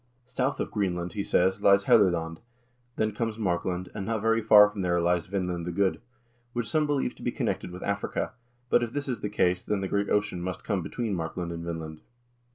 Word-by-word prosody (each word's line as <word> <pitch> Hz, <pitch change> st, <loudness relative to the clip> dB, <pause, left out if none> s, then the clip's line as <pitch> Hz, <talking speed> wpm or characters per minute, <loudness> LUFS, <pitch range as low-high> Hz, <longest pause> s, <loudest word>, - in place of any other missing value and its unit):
"South 130 Hz, +3 st, -1 dB
of -, -, -2 dB
Greenland," 90 Hz, -4 st, -1 dB
he 105 Hz, -, -2 dB
says, 95 Hz, +2 st, +2 dB
"lies 100 Hz, 0 st, +5 dB
Helluland, 85 Hz, -7 st, +3 dB, 0.6 s
then 110 Hz, 0 st, 0 dB
comes 110 Hz, +1 st, -3 dB
Markland, 90 Hz, -2 st, -1 dB
and 105 Hz, -, -4 dB
not 110 Hz, +2 st, -1 dB
very 115 Hz, 0 st, +3 dB
far 105 Hz, -1 st, +8 dB
from 105 Hz, -1 st, -5 dB
there 90 Hz, -1 st, +1 dB
lies 85 Hz, -1 st, +1 dB
Vinland 90 Hz, -3 st, -2 dB
the -, -, -1 dB
Good, 95 Hz, +2 st, +1 dB, 0.5 s
which 120 Hz, -2 st, -2 dB
some 155 Hz, -2 st, +1 dB
believe 145 Hz, -2 st, 0 dB
to -, -, -17 dB
be -, -, -1 dB
connected -, -, -2 dB
with 90 Hz, +1 st, -8 dB
Africa; 100 Hz, 0 st, -2 dB, 0.4 s
but -, -, +5 dB
if 120 Hz, -1 st, -3 dB
this 145 Hz, 0 st, -3 dB
is 125 Hz, -5 st, -3 dB
the 105 Hz, -, -2 dB
case, 90 Hz, -3 st, +1 dB
then 105 Hz, -2 st, -1 dB
the 95 Hz, -, -1 dB
great 100 Hz, +1 st, 0 dB
ocean 105 Hz, -4 st, 0 dB
must 90 Hz, 0 st, -4 dB
come 100 Hz, -3 st, -1 dB
between 115 Hz, +4 st, -3 dB
Markland 85 Hz, 0 st, -3 dB
and 85 Hz, 0 st, -5 dB
Vinland. 80 Hz, -2 st, -6 dB
100 Hz, 210 wpm, -27 LUFS, 90-105 Hz, 0.6 s, far